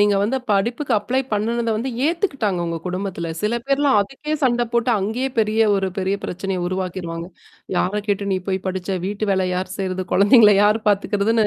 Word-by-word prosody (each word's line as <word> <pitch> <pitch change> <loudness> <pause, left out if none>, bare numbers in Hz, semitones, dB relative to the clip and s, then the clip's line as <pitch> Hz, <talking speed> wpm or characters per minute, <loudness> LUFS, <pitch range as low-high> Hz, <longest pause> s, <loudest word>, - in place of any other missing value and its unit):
நீங்க 205 -1 +4
வந்து 240 +6 0
படிப்புக்கு 235 +7 0
அப்ளை 245 +6 -1
பண்ணனத 230 +2 0
வந்து 245 +5 -2 0.2
ஏத்துக்கிட்டாங்க 275 - 0
உங்க 165 0 -3
குடும்பத்தில. 180 -2 -3
சில 225 +3 +1
பேர்லாம் 275 -2 +3
அதுக்கே 270 +8 -4
சண்ட 240 -2 +2
போட்டு 235 +1 +2
அங்கேயே 225 +7 -1
பெரிய 220 0 +2 0.2
ஒரு 195 -1 0
பெரிய 190 +1 0
பிரச்சனைய 185 0 -3
உருவாக்கிருவாங்க. 175 -2 -4 0.5
"யார 200 +4 0
கேட்டு 200 -1 -1
நீ 190 - +1
போய் 190 -1 +1
படிச்ச 185 0 -2
வீட்டு 205 +2 -2
வேல 190 -1 +1
யார் 185 +1 -3
செய்றது, 185 -1 -2
குழந்தைங்கள 210 +1 +6
யார் 210 +1 +4
பார்த்தக்கறிறதுன்னு?" 205 +2 +2
205 Hz, 170 wpm, -21 LUFS, 190-235 Hz, 0.5 s, குழந்தைங்கள